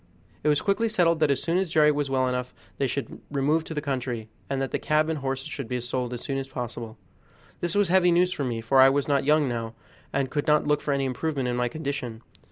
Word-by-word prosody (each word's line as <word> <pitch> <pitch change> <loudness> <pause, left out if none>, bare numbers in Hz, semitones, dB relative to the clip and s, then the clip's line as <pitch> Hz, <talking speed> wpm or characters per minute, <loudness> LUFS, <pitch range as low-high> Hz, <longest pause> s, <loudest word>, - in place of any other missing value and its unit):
It - - 0
was 150 -1 +3
quickly 215 +3 +1
settled 170 -5 +2
that 155 -2 +3
as 140 - +1
soon 170 +2 +1
as 190 -2 -1
Jerry 155 -1 +5
was 145 -1 -1
well 130 -1 +1
enough 125 0 -3 0.2
they 135 - +2
should 140 +2 -4
remove 145 +3 +1
to 160 - -6
the 150 - -2
country, 125 -5 -3 0.2
and 135 -1 -1
that 135 -1 -2
the - - -1
cab 155 +1 +2
and 160 -2 -1
horses 135 +1 -3
should 140 -6 -5
be 125 +2 -2
sold 125 0 -3
as 120 -1 -5
soon 135 -1 -2
as 135 0 -6
possible. 120 -3 -6 0.6
This 175 +1 -1
was 205 -3 +3
heavy 180 -1 +5
news 180 +1 +3
for 145 - -3
me, 120 -3 -2
for 130 +4 +3
I 130 0 +9
was 140 +1 0
not 140 -2 +2
young 150 0 +4
now, 115 -2 -3 0.4
and 135 -2 -1
could 145 0 -2
not 150 0 +4
look 150 0 +2
for 145 - -2
any 140 -1 +1
improvement 135 0 -2
in 120 - -1
my 125 0 +1
condition. 125 -5 -4
140 Hz, 255 wpm, -26 LUFS, 125-155 Hz, 0.6 s, I